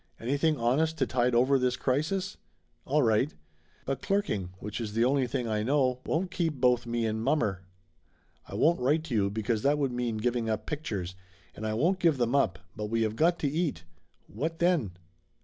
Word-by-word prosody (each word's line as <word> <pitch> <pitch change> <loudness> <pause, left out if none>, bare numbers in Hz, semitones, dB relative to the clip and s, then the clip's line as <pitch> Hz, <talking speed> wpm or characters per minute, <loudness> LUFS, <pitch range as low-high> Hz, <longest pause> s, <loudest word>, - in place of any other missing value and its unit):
Anything 145 +6 +1
honest 150 +7 +1
to 135 - +2
tide 125 -1 +1
over 130 +3 +4
this 125 0 +1
crisis? 170 +9 -1 0.5
All 150 +2 +2
right! 115 +5 +2 0.5
But 135 0 -2
clerking, 195 - -1
which 105 +4 -5
is 105 -2 -4
the 115 +2 +3
only 135 0 +2
thing 125 -1 -2
I 105 -1 0
know, 130 +1 +1
won't 175 +3 -1
keep 165 -4 -1
both 125 -2 +2
me 120 -1 -1
and 110 0 -1
mommer. 115 -8 +1 0.9
I - - -7
won't 170 +2 +3
write 145 +6 +2
to 155 -6 -6
you, 100 -3 +2
because 110 +1 -1
that 145 +4 +3
would 140 -3 0
mean 120 -2 -2
giving 120 0 -1
up 110 -1 -2
pictures, 105 - -4 0.4
and 110 - -4
I 110 - -1
won't 175 - +2
give 165 -6 +3
them 120 0 0
up, 95 -11 +2 0.2
but 105 - -4
we 115 +1 +1
have 110 0 -1
got 170 +6 +3
to 145 - +1
eat. 150 - -1 0.4
What 160 +9 -4
then?" 170 - +1
125 Hz, 195 wpm, -29 LUFS, 110-150 Hz, 0.9 s, over